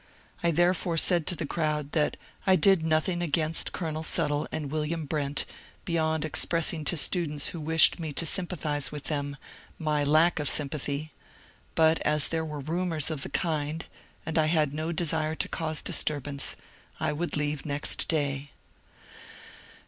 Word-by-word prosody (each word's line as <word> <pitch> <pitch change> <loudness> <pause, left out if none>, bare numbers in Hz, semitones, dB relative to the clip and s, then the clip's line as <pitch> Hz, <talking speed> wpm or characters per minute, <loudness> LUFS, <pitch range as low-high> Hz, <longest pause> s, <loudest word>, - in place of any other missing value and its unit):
I 170 - +2
therefore 175 +1 +2
said 170 0 +4
to 180 - +2
the 160 - -3
crowd 150 -2 -2
that 150 -3 +1 0.3
I 190 - +6
did 190 -3 +4
nothing 160 +2 +1
against 160 -1 +1
Colonel 160 -3 -4
Suttle 150 -2 0
and 145 -3 -4
William 155 +1 -2
Brent 140 -2 -1 0.4
beyond 160 -2 0
expressing 160 +1 +1
to 170 - +1
students 150 -2 +1
who 170 - -6
wished 160 +3 +4
me 160 -2 -4
to 165 - 0
sympathize 160 -5 +1
widi 150 -1 -6
them 145 -1 -3 0.4
my 150 -2 0
lack 155 +4 +4
of 145 - +1
sympathy; 145 +1 -1 0.6
but 160 0 +4
as 150 -1 +2
there 165 -1 -1
were 150 -2 -5
rumours 165 0 -1
of 155 -4 -3
the - - -3
kind 155 -2 -2 0.4
and 160 0 0
I 155 - +3
had 155 -3 +2
no 155 +2 -3
desire 160 -2 +1
to - - -2
cause 155 -1 -2
disturbance, 145 -1 -1 0.4
I - - 0
would 170 +1 -2
leave 150 -1 -2
next 145 -1 0
day. 145 -3 -1
155 Hz, 155 wpm, -28 LUFS, 150-165 Hz, 0.6 s, I